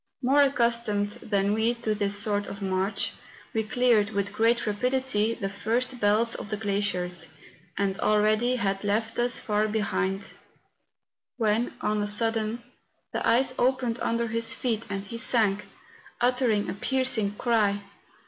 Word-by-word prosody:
More 275 +3 +4
accustomed 235 -6 +1
than 200 -1 0
we 225 +2 +1
to 225 -2 -1
this 205 -1 +1
sort 205 0 0
of 200 - -7
march, 195 +1 -1 0.4
he 225 - +1
cleared, 220 -2 +2
with 200 -1 -2
great 230 +2 +2
rapidity, 230 0 0
the 195 - -3
first 230 +6 -2
belts 215 +3 +3
of - - -6
the 215 - -2
glaciers, 190 -5 -2 0.5
and 195 -1 0
already 215 +4 +2
had 195 -4 -1
left 220 +3 -1
us 240 +1 +2
far 215 -1 0
behind, 200 -2 -2 1.0
when, 225 +1 0
on 210 0 0
a 205 - -1
sudden, 225 +2 0 0.5
the - - -2
ice 255 +2 +3
opened 250 -2 +1
under 230 0 0
his 230 0 0
feet, 230 -3 -2
and 195 -1 -3
he 230 +3 -6
sank, 215 -5 +1 0.5
uttering 245 -4 +2
a - - -2
piercing 225 -2 +1
cry. 210 -3 +1
215 Hz, 145 wpm, -27 LUFS, 205-235 Hz, 1.0 s, More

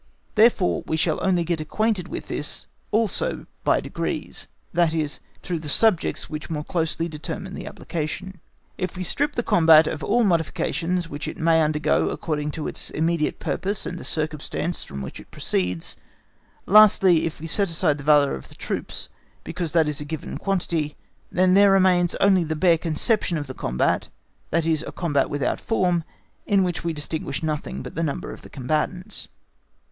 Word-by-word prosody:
Therefore 215 -4 +4
we 160 - 0
shall 160 -1 0
only 180 -2 +2
get 165 -1 -1
acquainted 205 +2 0
with - - -6
this 150 - -3 0.2
also 225 - 0 0.2
by - - +3
degrees, - - -4 0.3
that 170 -1 +3
is, 150 -2 -2 0.2
through 175 -3 -2
the 155 -1 -5
subjects 210 +2 +2
which 155 +1 -6
more 150 -2 -2
closely 165 0 -1
determine 165 +4 -6
the - - -6
application. 175 +3 -5 0.4
If 185 -1 -3
we 185 - -2
strip 290 - 0
the 240 - 0
combat 160 -4 +6
of 150 0 -3
all 240 +3 +3
modifications 170 -1 0
which 145 -1 -6
it - - -5
may 165 -1 +4
undergo 150 0 +2
according 150 -2 -2
to 155 - -4
its - - -4
immediate 160 0 0
purpose 200 +1 -2
and 175 - -4
the - - -8
circumstances 155 +2 -3
from 70 -1 -7
which 65 - -7
it - - -14
proceeds, 90 -2 -2 0.7
lastly 190 -5 +6
if 160 - -7
we 160 - -7
set 195 +4 +1
aside 155 -3 +1
the - - -7
valour 145 -1 +5
of 65 - -7
the - - -13
troops, - - -4 0.4
because 170 -4 -4
that 165 -2 +4
is 150 -1 -2
a - - -2
given 150 0 -5
quantity, 170 -6 -1 0.3
then 185 0 +3
there 200 +1 +7
remains 185 -2 +4
only 190 -3 +4
the 160 0 -2
bare 165 +1 +4
conception 170 +3 +1
of 145 - -3
the 130 - -7
combat, 65 - 0 0.4
that 165 0 +1
is 160 -1 +1
a - - -5
combat 145 -6 0
without 145 -2 -1
form, 180 -6 +1 0.4
in 200 -2 +4
which 180 -2 -2
we 170 - 0
distinguish 150 -1 -4
nothing 155 -2 -3
but - - -8
the 165 - -2
number 155 -4 -2
of - - -12
the - - -13
combatants. 155 +7 -2
165 Hz, 180 wpm, -24 LUFS, 150-185 Hz, 0.7 s, there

